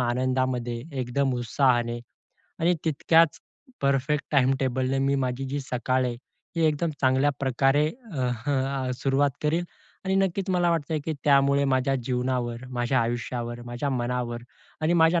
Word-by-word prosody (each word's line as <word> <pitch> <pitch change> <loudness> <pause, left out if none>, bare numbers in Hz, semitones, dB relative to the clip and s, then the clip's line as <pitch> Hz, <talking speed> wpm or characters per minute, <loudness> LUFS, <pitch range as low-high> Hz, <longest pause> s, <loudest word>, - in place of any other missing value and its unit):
आनंदामध्ये, 125 -1 0 0.2
एकदम 130 +1 0
उत्साहाने 120 -1 +1 0.6
आणि 170 +2 +3
तितक्याच 160 +1 +3 0.4
परफेक्ट 140 +2 +1
टाइमटेबलनं 130 -1 +2
मी 140 - +2
माझी 125 +2 -3
जी 140 +2 -3
सकाळ 130 -1 0
आहे, 120 -1 -2 0.4
ती 165 -1 +1
एकदम 155 +2 +1
चांगल्या 130 +2 +3
प्रकारे 135 +2 +2 0.3
अह 125 -1 -2
आ, 135 -1 0
सुरुवात 135 +2 +1
करीन 165 +4 +1 0.4
आणि 190 0 0
नक्कीच 195 0 0
मला 175 -1 +2
वाटतं 165 -1 -1
आहे 155 - 0
की 160 - -1
त्यामुळे 140 0 +4
माझ्या 135 0 +2
जीवनावर, 125 -1 -1
माझ्या 125 +1 0
आयुष्यावर, 120 0 -3
माझ्या 120 +4 -3
मनावर 120 -1 -2 0.4
आणि 155 +2 +2
माझ्या 165 0 +4
130 Hz, 140 wpm, -26 LUFS, 125-145 Hz, 0.6 s, त्यामुळे